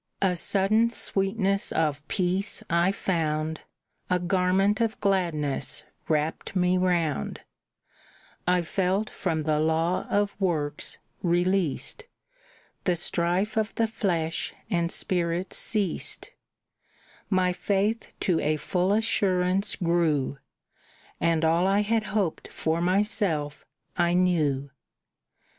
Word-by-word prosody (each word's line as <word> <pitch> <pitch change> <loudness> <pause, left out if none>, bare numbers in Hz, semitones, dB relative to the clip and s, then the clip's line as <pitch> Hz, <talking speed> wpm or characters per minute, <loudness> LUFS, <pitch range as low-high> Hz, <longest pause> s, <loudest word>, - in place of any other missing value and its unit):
"A 185 -2 +3
sudden 205 +6 +2
sweetness 195 -2 0
of 150 -2 -1
peace 185 +1 -1
I 170 +2 +3
found, 160 -5 -1 0.5
A 180 - +3
garment 190 +4 +2
of 225 -1 0
gladness 155 -9 0 0.2
wrapped 155 +4 -1
me 180 0 +3
round; 175 -5 0 1.1
I 180 -1 +3
felt 190 +5 0
from 160 -4 -2
the 150 0 +1
law 160 +3 +1
of 205 0 +1
works 150 -5 -1 0.2
released, 175 -2 0 0.8
The 180 - +2
strife 175 +5 +1
of 220 0 0
the 230 - +2
flesh 175 -8 -2 0.2
and 170 -2 +1
spirit 175 0 0
ceased, 205 -6 0 1.0
My 185 -2 +2
faith 205 +5 -1
to 175 -4 +2
a 155 +1 +1
full 180 +5 0
assurance 195 -3 +2
grew, 160 -6 +1 0.8
And 165 -1 +2
all 165 +3 +3
I 200 +1 +3
had 220 +1 0
hoped 195 -6 -2
for 160 +1 -1
myself 180 -5 0 0.3
I 175 0 +2
knew. 150 -7 +1
180 Hz, 110 wpm, -26 LUFS, 160-195 Hz, 1.1 s, A